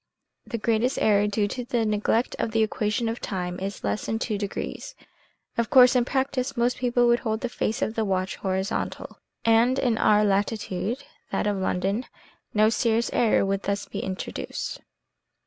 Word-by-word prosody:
The 235 Hz, -, -3 dB
greatest 230 Hz, +3 st, +1 dB
error 205 Hz, -1 st, +3 dB
due 205 Hz, 0 st, +1 dB
to 250 Hz, +4 st, -4 dB
the 235 Hz, -1 st, 0 dB
neglect 215 Hz, +3 st, +1 dB
of -, -, 0 dB
the 225 Hz, -1 st, +3 dB
equation 215 Hz, +1 st, -1 dB
of 230 Hz, +1 st, -2 dB
time 180 Hz, -2 st, -4 dB
is 195 Hz, +1 st, -5 dB
less 100 Hz, 0 st, -2 dB
than 225 Hz, -, 0 dB
2 225 Hz, -1 st, -2 dB
degrees. 210 Hz, -, -5 dB, 0.6 s
Of 230 Hz, -, +1 dB
course, 250 Hz, 0 st, +7 dB
in 245 Hz, -1 st, +3 dB
practice, 265 Hz, 0 st, -1 dB
most 240 Hz, +1 st, +1 dB
people 245 Hz, -1 st, +2 dB
would 240 Hz, 0 st, +4 dB
hold 220 Hz, -3 st, -2 dB
the 250 Hz, -, -2 dB
face 220 Hz, -1 st, -1 dB
of 220 Hz, -, -1 dB
the 225 Hz, -, 0 dB
watch 190 Hz, -2 st, -1 dB
horizontal, 190 Hz, +2 st, -3 dB, 0.3 s
and 230 Hz, +3 st, +4 dB
in 240 Hz, -4 st, +1 dB
our 210 Hz, 0 st, +4 dB
latitude 205 Hz, +4 st, -1 dB, 0.3 s
(that -, -, 0 dB
of 205 Hz, -1 st, 0 dB
London) 195 Hz, +5 st, -1 dB, 0.4 s
no 215 Hz, 0 st, +4 dB
serious 230 Hz, 0 st, +1 dB
error 225 Hz, -4 st, +3 dB
would 195 Hz, 0 st, -1 dB
thus 200 Hz, 0 st, -2 dB
be -, -, -5 dB
introduced. 190 Hz, 0 st, -5 dB
220 Hz, 175 wpm, -25 LUFS, 200-240 Hz, 0.6 s, course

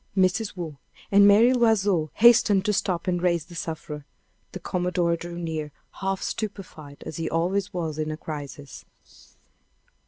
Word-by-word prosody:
Mrs. 190 Hz, +2 st, +1 dB
Waugh 160 Hz, -5 st, -6 dB, 0.3 s
and 200 Hz, 0 st, +7 dB
Mary 225 Hz, +5 st, +6 dB
L'Oiseau 205 Hz, -9 st, +2 dB
hastened 215 Hz, -4 st, +5 dB
to 210 Hz, -, +2 dB
stoop 180 Hz, -3 st, -1 dB
and 175 Hz, -1 st, 0 dB
raise 170 Hz, -3 st, +1 dB
the 175 Hz, -, -14 dB
sufferer. 160 Hz, -3 st, -5 dB, 0.5 s
The 190 Hz, -, -7 dB
commodore 180 Hz, -1 st, 0 dB
drew 170 Hz, +1 st, -7 dB
near, 160 Hz, -3 st, -4 dB, 0.3 s
half 195 Hz, 0 st, -2 dB
stupefied, 175 Hz, -9 st, -6 dB
as 155 Hz, -, -6 dB
he 165 Hz, -1 st, -2 dB
always 185 Hz, +4 st, 0 dB
was 165 Hz, -5 st, -4 dB
in 155 Hz, 0 st, -1 dB
a 155 Hz, -, -4 dB
crisis. 145 Hz, -3 st, -8 dB
175 Hz, 150 wpm, -25 LUFS, 160-195 Hz, 0.5 s, and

